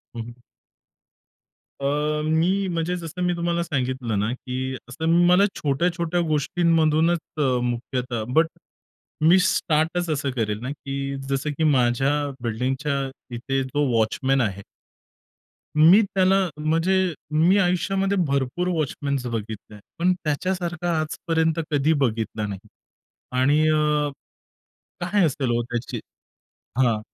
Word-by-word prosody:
हं, 115 Hz, -, -4 dB
हं. 120 Hz, +1 st, -9 dB, 1.5 s
अ, -, -, -2 dB, 0.4 s
मी 180 Hz, +5 st, +1 dB
म्हणजे 170 Hz, +1 st, -1 dB
जसं 175 Hz, +1 st, -7 dB
मी 180 Hz, 0 st, +1 dB
तुम्हाला 170 Hz, 0 st, -1 dB
सांगितलं 130 Hz, -8 st, -2 dB
ना, 105 Hz, +3 st, 0 dB
की 130 Hz, +1 st, -4 dB
असं 160 Hz, +6 st, -5 dB, 0.2 s
मला 180 Hz, +3 st, +6 dB
छोट्या-छोट्या 170 Hz, +4 st, 0 dB
गोष्टींमधूनच 160 Hz, +2 st, +2 dB, 0.2 s
अ, -, -, 0 dB, 0.2 s
मुख्यतः 120 Hz, -1 st, -2 dB
बट 160 Hz, +2 st, +4 dB, 0.7 s
मी 170 Hz, +4 st, +6 dB
स्टार्टच 165 Hz, 0 st, +1 dB
असं 140 Hz, -2 st, -1 dB
करेल 105 Hz, -3 st, -1 dB
ना, 125 Hz, -, -4 dB
की 140 Hz, -1 st, -4 dB
जसं 135 Hz, +2 st, -1 dB
की 160 Hz, -, 0 dB
माझ्या 135 Hz, -2 st, +3 dB, 0.3 s
बिल्डिंगच्या 130 Hz, +5 st, -1 dB, 0.4 s
इथे 135 Hz, +3 st, -1 dB
जो 145 Hz, +3 st, -1 dB
वॉचमन 130 Hz, +5 st, +1 dB
आहे 100 Hz, -4 st, -2 dB, 1.1 s
मी 170 Hz, +8 st, +7 dB
त्याला 190 Hz, -1 st, +2 dB, 0.2 s
म्हणजे 165 Hz, +4 st, +1 dB, 0.4 s
मी 165 Hz, +6 st, +4 dB
आयुष्यामध्ये 195 Hz, +2 st, +1 dB
भरपूर 140 Hz, +6 st, -1 dB
वॉचमॅन्स 140 Hz, -4 st, -2 dB
बघितले, 110 Hz, -2 st, -6 dB, 0.2 s
पण 180 Hz, +2 st, +3 dB
त्याच्यासारखा 175 Hz, +1 st, -1 dB
आजपर्यंत 160 Hz, +1 st, 0 dB
कधी 145 Hz, +2 st, +3 dB
बघितला 110 Hz, -3 st, -1 dB
नाही 100 Hz, +1 st, -8 dB, 0.7 s
आणि 145 Hz, +3 st, +4 dB
अ, 150 Hz, -1 st, +2 dB, 0.9 s
काय 185 Hz, +1 st, +2 dB
असेल 135 Hz, -4 st, -1 dB
हो 120 Hz, -, +1 dB
त्याची 120 Hz, 0 st, -4 dB, 0.8 s
हां. 115 Hz, -4 st, +3 dB
150 Hz, 115 wpm, -24 LUFS, 125-170 Hz, 1.5 s, मी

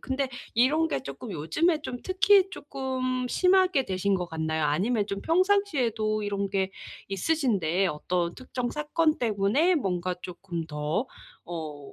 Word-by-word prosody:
근데 265 Hz, 0 st, -2 dB, 0.3 s
이런 290 Hz, +7 st, +4 dB
게 135 Hz, -, -2 dB
쪼끔 140 Hz, -, -7 dB
요즘에 305 Hz, -, +1 dB
좀 245 Hz, -, -4 dB
특히 385 Hz, +1 st, +4 dB
쪼끔 260 Hz, -5 st, -3 dB
심하게 365 Hz, -5 st, +3 dB
되신 195 Hz, +1 st, 0 dB
것 180 Hz, -2 st, -1 dB
같나요? 160 Hz, -1 st, -1 dB
아니면 205 Hz, +8 st, +1 dB
좀 200 Hz, -1 st, -4 dB
평상시에도 295 Hz, -, +1 dB
이런 200 Hz, -1 st, -1 dB
게 190 Hz, -1 st, 0 dB, 0.4 s
있으신데 195 Hz, -, +1 dB
어떤 170 Hz, +1 st, -1 dB
특정 250 Hz, -1 st, -4 dB
사건 310 Hz, +1 st, +1 dB
때문에 235 Hz, -, +2 dB
뭔가 180 Hz, -, -1 dB
쪼끔 175 Hz, -2 st, -5 dB
더 150 Hz, -, -2 dB, 0.4 s
어 155 Hz, -4 st, -7 dB
215 Hz, 275 characters per minute, -27 LUFS, 180-295 Hz, 0.4 s, 이런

